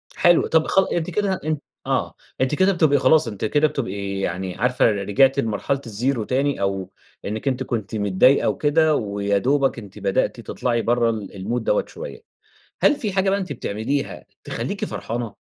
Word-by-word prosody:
حلو، 175 Hz, -1 st, +4 dB
طَب 160 Hz, -1 st, +2 dB
خ -, -, +3 dB
أنتِ 170 Hz, -2 st, -1 dB
كده 205 Hz, -2 st, 0 dB
أ 155 Hz, 0 st, 0 dB, 0.3 s
آه، -, -, 0 dB, 0.3 s
أنتِ 130 Hz, +3 st, +2 dB
كده 190 Hz, +4 st, +4 dB
بتبقي 155 Hz, -5 st, +3 dB
خلاص، 155 Hz, +1 st, +4 dB
أنتِ 105 Hz, -2 st, -4 dB
كده 145 Hz, +7 st, +3 dB
بتبقي 100 Hz, -9 st, -4 dB
يعني 95 Hz, 0 st, -3 dB
عارفة 125 Hz, +3 st, +2 dB
رجِعتِ 105 Hz, +7 st, +2 dB
لمرحلة 125 Hz, +4 st, -1 dB
الزيرو 115 Hz, +2 st, -1 dB
تاني 140 Hz, +5 st, 0 dB
أو 95 Hz, -1 st, -1 dB, 0.4 s
إنِك 110 Hz, +6 st, -4 dB
أنتِ 130 Hz, -1 st, 0 dB
كنتِ 110 Hz, -4 st, -4 dB
متضايقة 105 Hz, +6 st, +3 dB
وكده 155 Hz, +1 st, +2 dB
ويا 100 Hz, -3 st, 0 dB
دوبك 135 Hz, +4 st, +1 dB
أنتِ 100 Hz, -4 st, -11 dB
بدأتِ 100 Hz, -1 st, 0 dB
تطلَعي 120 Hz, -2 st, -1 dB
برَّه 120 Hz, 0 st, +2 dB
ال 110 Hz, -3 st, -5 dB
المود 105 Hz, +6 st, -3 dB
ده -, -, +1 dB
شوية. 480 Hz, -2 st, -9 dB, 0.6 s
هل 295 Hz, -, +5 dB
فيه 215 Hz, -7 st, -2 dB
حاجة 190 Hz, 0 st, +2 dB
بقى 200 Hz, -, +1 dB
أنتِ 185 Hz, -7 st, -4 dB
بتعمليها 120 Hz, +3 st, -3 dB, 0.2 s
تخلّيكِ -, -, -3 dB
فرحانة، 115 Hz, -2 st, -4 dB
125 Hz, 170 wpm, -22 LUFS, 105-150 Hz, 0.6 s, هل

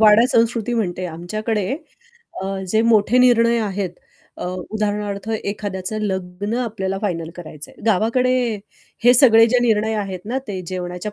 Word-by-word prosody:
वाडा 215 Hz, +2 st, +7 dB
संस्कृती 230 Hz, 0 st, +1 dB
म्हणते 185 Hz, -5 st, -2 dB
आमच्याकडे 200 Hz, +5 st, -3 dB, 0.7 s
अ, -, -, -3 dB, 0.2 s
जे 220 Hz, +4 st, +2 dB
मोठे 230 Hz, +1 st, +4 dB
निर्णय 235 Hz, -2 st, +5 dB
आहेत 195 Hz, -3 st, -2 dB, 0.5 s
अ, -, -, -6 dB, 0.3 s
उदाहरणार्थ 210 Hz, -1 st, -2 dB
एखाद्याचं 205 Hz, -1 st, -3 dB
लग्न 190 Hz, +1 st, -3 dB
आपल्याला 195 Hz, -5 st, -2 dB
फायनल 165 Hz, -5 st, -2 dB
करायचंय. 155 Hz, -3 st, -10 dB
गावाकडे 230 Hz, +5 st, +2 dB, 0.7 s
हे 245 Hz, -, +7 dB
सगळे 230 Hz, -3 st, +7 dB
जे 245 Hz, +2 st, +3 dB
निर्णय 220 Hz, -1 st, +2 dB
आहेत 195 Hz, -4 st, -3 dB
ना 250 Hz, +5 st, -2 dB
ते 190 Hz, -2 st, -3 dB
जेवणाच्या 180 Hz, +2 st, -5 dB
210 Hz, 135 wpm, -20 LUFS, 190-230 Hz, 0.7 s, वाडा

